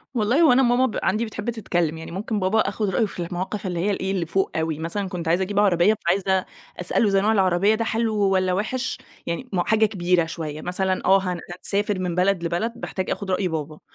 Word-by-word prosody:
والله 240 +8 +3
وأنا 265 -2 +5
ماما 245 +1 +3
ب 225 - -2
عندي 215 +5 +1
بتحب 220 +1 -5
تتكلّم، 175 -8 -1
يعني 160 - -8
ممكن 205 +4 -3
بابا 190 +3 +2
آخُد 205 0 0
رأيه 205 +4 +2
في 200 - -9
المواقِف 190 +3 -4
اللي 175 -2 -2
هي 200 +4 +1
إيه، 190 -1 -2
اللي 185 -3 -1
فوق 190 +4 0
أوي، 160 -1 -1
مثلًا 185 +4 -3
كنت 180 -3 -5
عايزة 175 +3 +2
أجيب 200 +1 -1
عربية 200 0 +4
فعايزة 190 +1 +1 0.3
أسأله 185 +4 +1
زي 195 -1 +3
نوع 210 +2 +2
العربية 195 0 +3
ده 230 +1 -2
حلو 225 -1 0
والّا 190 -2 +2
وحِش، 245 +7 -2 0.3
يعني 210 +10 -4
م 180 - +2
حاجة 220 +4 +3
كبيرة 180 -4 +1
شوية 155 -2 -6
مثلًا، 185 +1 -1
آه، 195 +1 +6
هن 180 -2 -2 0.2
هنسافر 205 0 -1
من 180 -2 -2
بلد 180 0 +2
لبلد 175 +7 -1
باحتاج 190 -5 -4
آخُد 200 -2 -3
رأي 185 +1 +1
بابا، 155 -2 -4
190 Hz, 215 wpm, -23 LUFS, 175-215 Hz, 0.3 s, آه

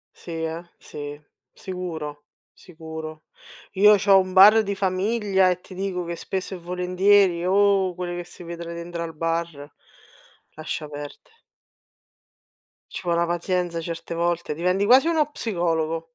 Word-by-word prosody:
Sì, 170 - -11
eh. 160 +1 -3 0.2
Sì, 145 0 -8 0.3
sicuro, 160 -6 -6 0.3
sicuro. 160 -2 -9 0.5
Io 210 +2 +7
c'ho 195 0 +5
un 185 0 -2
bar 205 +4 +8
di 200 -1 -3
famiglia 195 0 +1
e 180 0 -1
ti 185 - -14
dico 185 -1 -3
che 170 0 -4
spesso 190 +2 -4
e - - -5
volentieri, 180 +1 +2
oh 195 -1 +3
quell 175 -1 -4
che 175 - -4
si 175 0 -12
vedon 170 0 -7
dentr 170 0 -6
al 165 -2 -5
bar, 165 -3 -3 0.8
lascia 155 0 -5
perde. 145 - -10 1.6
Ci - - -6
vò 170 -1 +1
na 170 - +2
pazienza, 175 0 -1
certe 170 0 -6
volte, 170 -1 -1
diventi 180 +5 0
quasi 260 +8 +6
uno 315 -3 +2
psicologo. 165 - -1
175 Hz, 140 wpm, -24 LUFS, 165-190 Hz, 1.6 s, bar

